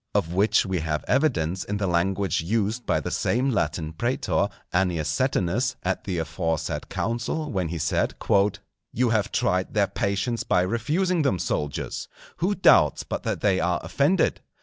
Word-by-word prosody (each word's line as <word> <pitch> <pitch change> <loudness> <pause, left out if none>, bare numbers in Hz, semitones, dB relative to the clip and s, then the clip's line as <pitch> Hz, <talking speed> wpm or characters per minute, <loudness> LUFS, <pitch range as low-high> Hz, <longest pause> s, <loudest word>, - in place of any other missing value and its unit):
Of 85 - +1
which 105 +3 +3
we 95 -2 -1
have 75 -1 -2
evidence 95 - +1
in 105 - -3
the 100 - -1
language 95 +1 +1
used 110 +6 -1
by - - +2
the - - -4
same 130 +3 +1
Latin 80 -6 -1
Prætor, 120 +10 0 0.2
Annius 90 -4 +1
Setinus, 120 - 0
at 95 +1 -2
the 95 -3 -2
aforesaid 80 -1 -2
council, 120 +7 -2
when 95 -3 -1
he 85 +1 -4
said:—"_You 100 +8 0
have 110 -3 +1
tried 95 +1 0
their 105 -2 +4
patience 100 +4 -1
by 90 - +2
refusing 155 - 0
them, 135 -10 +1
soldiers. 75 -4 -3 0.3
Who 190 +4 0
doubts 75 - +5
but - - -4
that - - -3
they 95 -3 +2
are 90 -1 +1
offended? 160 +6 +1
95 Hz, 155 wpm, -25 LUFS, 85-120 Hz, 0.3 s, doubts